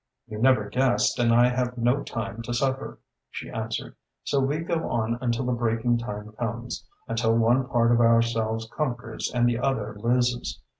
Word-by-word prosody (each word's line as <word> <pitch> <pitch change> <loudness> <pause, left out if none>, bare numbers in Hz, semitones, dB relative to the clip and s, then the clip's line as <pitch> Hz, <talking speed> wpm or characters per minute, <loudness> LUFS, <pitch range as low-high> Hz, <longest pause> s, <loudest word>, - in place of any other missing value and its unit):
"You 110 -3 -7
never 120 -4 +4
guessed 125 +1 +1
and 120 -1 +3
I 120 +1 +5
have 125 0 -1
no 120 +4 +2
time 115 -1 -5
to 120 - -2
suffer," 135 +1 -1 0.3
she - - -7
answered. - - -4 0.3
"So 140 - +1
we 135 +3 +1
go 165 0 -2
on 115 0 -1
until 120 0 0
the 125 - 0
breaking 120 0 +1
time 105 -2 -6
comes, 120 +1 -4 0.2
until 115 0 +1
one 120 +3 +3
part 120 -3 +2
of 120 0 +4
ourselves 115 -1 +2
conquers 120 -6 -3
and 120 -1 +2
the 120 -1 +1
other 115 -5 -1
loses. 120 +2 0
120 Hz, 170 wpm, -26 LUFS, 115-125 Hz, 0.3 s, I